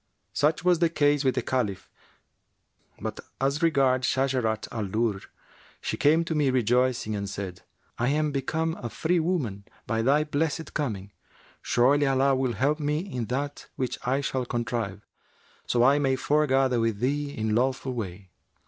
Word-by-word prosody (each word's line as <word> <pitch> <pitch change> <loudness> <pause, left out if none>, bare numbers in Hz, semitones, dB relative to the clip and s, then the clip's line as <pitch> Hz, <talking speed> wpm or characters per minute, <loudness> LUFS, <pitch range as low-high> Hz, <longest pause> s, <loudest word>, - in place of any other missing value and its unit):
Such 150 +8 +1
was 180 -2 +4
the 170 -1 +3
case 145 -2 +2
with 130 -2 +2
the - - 0
Caliph; 115 -7 -1 1.1
but - - -5 0.2
as 140 +4 0
regards 135 -6 +3
Shajarat 130 -5 0
al 110 -3 -3
Durr, 110 0 0 0.6
she - - -3
came 160 +3 +3
to 165 - -2
me 150 -3 +2
rejoicing 125 -2 +1
and 100 -1 -3
said, 95 -3 -6 0.4
'I 120 - +1
am 150 +2 +1
become 160 +4 -1
a 120 - -4
free 165 - 0
woman 145 - -1 0.2
by 115 0 0
thy 140 +6 +3
blessed 155 +1 -2
coming! 105 -9 -3 0.5
Surely 140 +4 +3
Allah 135 0 +3
will 130 -2 0
help 145 +7 +1
me 150 0 0
in 155 - -3
that 140 +5 -4
which 125 -2 -3
I 135 +3 +1
shall 130 -1 -2
contrive, 115 -4 -3 0.6
so 120 -1 +3
I 140 +3 +5
may 135 -2 +2
foregather 135 -3 +2
with 115 -2 0
thee 145 +4 0
in 110 0 0
lawful 130 +2 0
way.' 95 -5 -6
130 Hz, 160 wpm, -27 LUFS, 115-145 Hz, 1.1 s, I